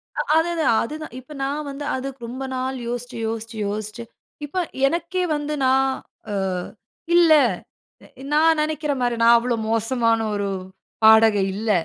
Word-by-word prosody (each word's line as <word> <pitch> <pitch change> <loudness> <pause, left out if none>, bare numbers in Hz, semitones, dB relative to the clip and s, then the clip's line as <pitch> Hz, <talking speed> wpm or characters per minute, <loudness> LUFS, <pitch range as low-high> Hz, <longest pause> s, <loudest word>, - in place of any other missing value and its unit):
அ - - 0 0.2
அதுதான் 325 -6 +2
அதுதான். 305 +2 -7
இப்ப, 260 +4 -16
நான் 285 +2 -3
வந்து 280 +1 -6
அதுக்கு, 270 +1 -6
ரொம்ப 260 +3 -6
நாள் 260 +1 -2
யோசிச்சு 245 0 -5
யோசிச்சு 225 0 -5
யோசிச்சு, 215 +3 -4 0.4
இப்ப, 295 +5 -8 0.3
எனக்கே 345 +4 -1
வந்து 295 0 -3
நான் 265 +1 +3 0.4
அ - - -3 0.8
"இல்லை. 325 -4 +6 0.9
நான் 320 +1 +4
நெனைக்கிற 305 -1 -1
மாரி, 240 -1 +1
நான் 235 +1 +7
அவ்வளோ 240 0 0
மோசமான 230 0 +1 0.2
ஒரு 200 0 -1 0.6
பாடகி 220 -1 +6
இல்ல. 215 +1 -1
260 Hz, 135 wpm, -22 LUFS, 230-300 Hz, 0.9 s, நான்